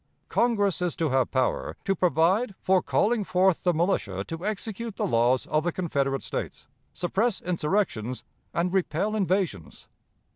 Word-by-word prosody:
Congress 205 -6 +1
is 180 -2 0
to 160 -2 0
have 130 -2 +2
power 130 -1 -1
'to 195 - +1
provide 185 - +2
for 190 -1 +3
calling 220 +1 +1
forth 185 -1 +2
the 180 - +3
militia 155 - 0
to 165 - -7
execute 215 +1 -4
the - - -1
laws 120 +2 +2
of 155 0 0
the 175 - 0
Confederate 140 -6 -1
States, - - -5 0.3
suppress 195 +4 0
insurrections, 155 - -1 0.3
and 175 +2 -1
repel 190 +3 0
invasions.' 185 - -1
180 Hz, 145 wpm, -26 LUFS, 150-200 Hz, 0.3 s, for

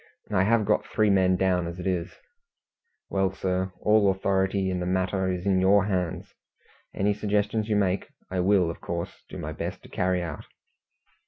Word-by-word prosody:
I 100 -3 +3
have 110 0 +3
got 105 - +2
three 105 -1 +2
men 95 -1 +4
down 90 -2 +1
as 85 +1 -6
it 90 - -6
is." 90 -2 -2 1.0
"Well, 95 -1 +1
sir, 95 0 -2
all 105 -1 +4
authority 95 0 +1
in 90 - -2
the 90 - -2
matter 95 +1 0
is 90 0 -4
in 95 -2 +3
your 100 +1 +5
hands. 90 -5 -2 0.6
Any 100 +1 +1
suggestions 105 +1 -1
you 105 - +2
make, 95 -2 +1 0.2
I 95 - -1
will, 90 -2 +3
of - - -11
course, 85 0 -5
do - - -8
my - - -5
best - - -5
to - - -14
carry 90 -1 0
out." 80 -4 -6
95 Hz, 180 wpm, -26 LUFS, 90-100 Hz, 1.0 s, your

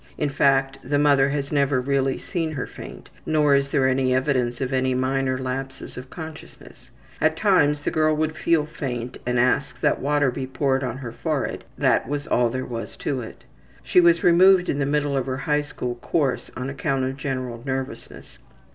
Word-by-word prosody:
In 150 - 0
fact, 135 -1 +2
the 145 +3 0
mother 140 -2 +4
has 140 0 -3
never 140 -2 +2
really 135 0 0
seen 165 -3 -3
her 135 - -3
faint, - - -11
nor 150 -2 +3
is 140 0 +2
there 135 -2 +2
any 130 -1 +2
evidence 130 -2 0
of 130 -1 -2
any 130 0 +1
minor 130 0 0
lapses 130 +1 -5
of 125 +1 -9
consciousness. 160 +3 -11 0.3
At 155 +1 +2
times 150 -8 +3
the - - -1
girl 155 0 +2
would 155 0 -1
feel 155 -1 +2
faint 125 -6 -5
and 125 0 +1
ask 125 +2 +1
that - - +2
water 145 -1 +2
be 130 +1 -5
poured 135 0 0
on 125 -1 -3
her 125 -4 -6
forehead - - -3
that - - +2
was 145 0 -2
all 120 -1 +2
there 130 +2 -3
was 115 -2 -6
to 135 -3 -2
it. 110 - -10 0.4
She 180 - +4
was 170 -1 +4
removed 180 +1 +6
in 140 - 0
the 135 - 0
middle 145 -1 0
of 135 -1 -1
her 130 0 -2
high 150 +1 +1
school 125 -4 -5
course 135 +2 -1
on 130 0 -3
account 135 -1 -1
of 130 +1 -3
general 130 -4 -4
nervousness. 130 0 -6
135 Hz, 190 wpm, -23 LUFS, 130-150 Hz, 0.4 s, removed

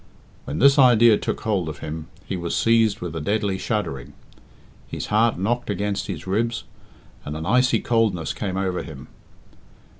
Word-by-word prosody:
When 75 - -4
this 140 +2 +5
idea 120 -3 +6
took - - -3
hold 100 -7 -1
of 75 - -7
him, 80 +2 -6 0.2
he - - -3
was 85 -1 -2
seized 115 -2 +3
with 85 -2 -5
a 80 - -3
deadly 100 +2 -1
shuddering. 105 - -3 0.7
His - - -5
heart 115 +2 +3
knocked 120 +6 -1
against 100 0 -2
his 85 -5 -6
ribs, 115 +5 -1 0.6
and 75 +1 -5
an 80 - -5
icy 125 +5 +3
coldness 110 -8 0
came 95 -2 -3
over 95 -2 -1
him. 70 -5 -10
100 Hz, 160 wpm, -23 LUFS, 85-115 Hz, 0.7 s, idea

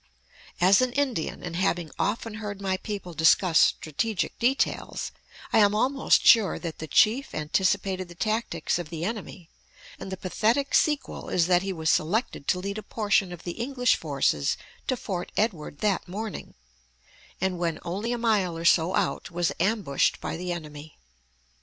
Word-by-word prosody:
As 190 +4 +5
an 255 -1 0
Indian, 260 - -1
and 175 -1 -5
having 175 -3 0
often 225 +1 -1
heard 205 -2 -5
my 190 -1 -1
people 200 -4 -6
discuss 160 +2 +4
strategic 195 +7 0
details, 255 +3 0 0.4
I - - +6
am 205 -1 +4
almost 270 +5 +2
sure 220 -5 +6
that 165 -3 -6
the 160 - -5
chief 225 - +3
anticipated 185 +4 0
the 175 - -13
tactics 215 -5 -1
of 170 -3 -6
the 165 0 -4
enemy; 205 -5 -6 0.5
and 190 - -7
the 190 - -4
pathetic 225 +9 0
sequel 295 -3 +1
is 170 - +2
that 180 0 +3
he 195 +1 -3
was 160 -3 0
selected 180 - 0
to 180 - +2
lead 200 +3 -4
a - - -6
portion 205 -3 0
of 175 - -9
the 175 - -4
English 250 -1 +2
forces 135 - 0 0.3
to 255 - 0
Fort 185 -6 -4
Edward 170 -9 -1
that 205 -3 0
morning, 210 +4 -6 0.8
and 185 -1 -1
when 165 -2 -1
only 200 +7 -3
a 245 - -1
mile 210 -7 +1
or 165 - -5
so 170 +1 +4
out - - -1
was 175 -1 0
ambushed 200 -9 +1
by - - -4
the 180 +2 -4
enemy. 155 -2 -8
190 Hz, 165 wpm, -26 LUFS, 170-220 Hz, 0.8 s, I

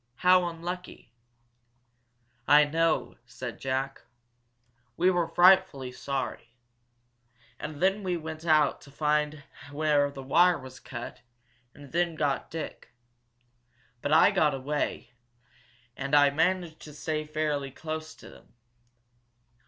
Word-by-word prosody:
How 180 0 +6
unlucky!" 170 -7 -7 1.3
"I 150 +1 +7
know," 165 +3 0
said - - -7
Jack. 135 +1 -2 1.0
"We 180 +2 +4
were 175 -2 0
frightfully 175 -6 +4
sorry. 125 -3 -5 1.0
And 150 +2 -6
then 195 +2 +2
we 180 -3 -1
went 160 0 -7
out 155 -3 +3
to 145 - -15
find 150 0 -1 0.3
where 145 -1 +2
the 135 -1 -9
wire 175 +6 +4
was 130 -2 -11
cut, 120 -2 -8 0.5
and 145 -2 -13
then 170 0 0
got 145 -3 -1
Dick. 160 -6 -7 1.1
But 145 - -2
I - - +6
got 150 -3 +2
away, 145 +3 -3 0.8
and 140 +1 -1
I 145 -1 +6
managed 165 +1 0
to 150 - -11
stay 155 +1 -3
fairly 150 -2 -2
close 155 +3 -6
to - - -14
them. - - -19
155 Hz, 120 wpm, -28 LUFS, 140-165 Hz, 1.3 s, I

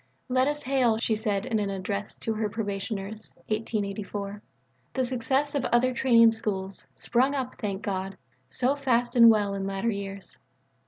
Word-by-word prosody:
"Let 255 +1 +3
us 295 0 -1
hail," 250 -4 +2
she 225 -1 +1
said 210 -1 -1
in 230 -4 0
an 205 -1 -1
Address 200 +2 -3
to 225 - -3
her 215 0 -1
own - - -1
Probationers 205 0 -4
(1884), 205 -2 -3 0.5
"the 260 - +2
successes 265 +3 0
of 280 -3 0
other 250 +1 +3
Training 230 -2 +6
Schools, 195 -4 -3
sprung 260 +4 +1
up, 260 -2 -2
thank 200 -3 -3
God, 195 -1 -3 0.3
so 260 +2 +2
fast 245 -3 +1
and 235 -1 +9
well 205 -3 +3
in 195 0 -3
latter 195 +4 -1
years. 200 -1 -6
220 Hz, 165 wpm, -27 LUFS, 200-250 Hz, 0.5 s, and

